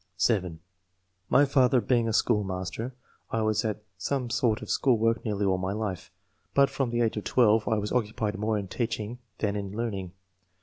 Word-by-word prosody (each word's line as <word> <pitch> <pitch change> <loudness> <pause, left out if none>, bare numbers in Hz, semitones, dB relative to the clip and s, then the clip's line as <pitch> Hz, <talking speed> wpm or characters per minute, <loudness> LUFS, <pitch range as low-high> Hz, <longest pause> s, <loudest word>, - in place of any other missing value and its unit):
(7) 90 -5 +1 0.3
" 90 +1 -46
My 145 - +7
father 130 -2 +4
being 120 +1 +1
a - - 0
schoolmaster, 105 +2 -1 0.3
I 115 -1 0
was 110 0 +1
at 105 -1 -3 0.2
some 125 +5 -2
sort 120 -2 +1
of - - -9
school 130 -4 +3
work 115 +1 +1
nearly 105 -2 -1
all 95 -1 +2
my 95 +1 -2
life, 105 -5 -4 0.5
but 140 0 +5
from 135 -2 -1
the 120 0 0
age 110 -2 +1
of 105 - -3
12 110 -3 +3
I 110 - +2
was 105 0 -2
occupied 110 -3 -1
more 110 0 0
in 100 -2 -4
teaching 115 +2 -3 0.2
than 105 -1 -1
in 100 -1 -4
learning. 100 -6 -3
110 Hz, 190 wpm, -28 LUFS, 100-120 Hz, 0.5 s, My